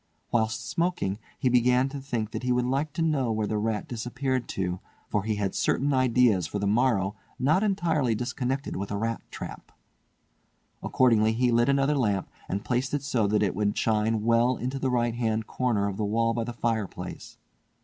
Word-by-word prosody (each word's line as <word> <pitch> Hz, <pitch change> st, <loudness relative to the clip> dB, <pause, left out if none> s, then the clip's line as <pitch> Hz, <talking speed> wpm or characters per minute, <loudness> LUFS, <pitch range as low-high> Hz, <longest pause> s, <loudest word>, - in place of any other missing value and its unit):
Whilst 115 Hz, 0 st, 0 dB
smoking 165 Hz, -, -1 dB, 0.2 s
he -, -, 0 dB
began 125 Hz, +1 st, +4 dB
to 140 Hz, +1 st, -6 dB
think 120 Hz, -5 st, -3 dB
that -, -, -4 dB
he 125 Hz, 0 st, 0 dB
would 125 Hz, 0 st, +2 dB
like 140 Hz, +4 st, 0 dB
to 165 Hz, -, -1 dB
know 140 Hz, -7 st, +1 dB
where 110 Hz, -1 st, 0 dB
the 105 Hz, 0 st, -1 dB
rat 110 Hz, -1 st, -1 dB
disappeared 125 Hz, +2 st, -2 dB
to, 90 Hz, -1 st, -2 dB, 0.3 s
for 105 Hz, -, +1 dB
he 110 Hz, +1 st, -1 dB
had 100 Hz, -2 st, -1 dB
certain 140 Hz, +1 st, +1 dB
ideas 125 Hz, -, +3 dB
for 105 Hz, -, -4 dB
the 100 Hz, -, -1 dB
morrow 105 Hz, -2 st, +2 dB, 0.2 s
not 155 Hz, +8 st, +3 dB
entirely 165 Hz, -, +1 dB
disconnected 130 Hz, +3 st, -2 dB
with 100 Hz, +1 st, -4 dB
a 100 Hz, -, -2 dB
rat 115 Hz, 0 st, -2 dB
trap. -, -, -8 dB, 1.1 s
Accordingly 110 Hz, -3 st, +3 dB
he 125 Hz, +2 st, +2 dB
lit 120 Hz, +2 st, +3 dB
another 140 Hz, +1 st, +3 dB
lamp 105 Hz, -8 st, 0 dB, 0.2 s
and 100 Hz, +1 st, -3 dB
placed 125 Hz, +3 st, 0 dB
it 145 Hz, -, -2 dB
so 125 Hz, -7 st, +1 dB
that 105 Hz, +1 st, +2 dB
it 100 Hz, -, +1 dB
would 105 Hz, +1 st, 0 dB
shine 110 Hz, 0 st, +1 dB
well 115 Hz, +2 st, +3 dB
into 130 Hz, +3 st, -3 dB
the 135 Hz, -, 0 dB
right 120 Hz, -2 st, +1 dB
hand 110 Hz, -2 st, -1 dB
corner 110 Hz, -6 st, 0 dB
of 100 Hz, -1 st, -4 dB
the 110 Hz, -, -1 dB
wall 115 Hz, +2 st, +1 dB
by 115 Hz, -1 st, -2 dB
the 120 Hz, -, -5 dB
fireplace. 115 Hz, -4 st, -4 dB
120 Hz, 190 wpm, -27 LUFS, 105-130 Hz, 1.1 s, began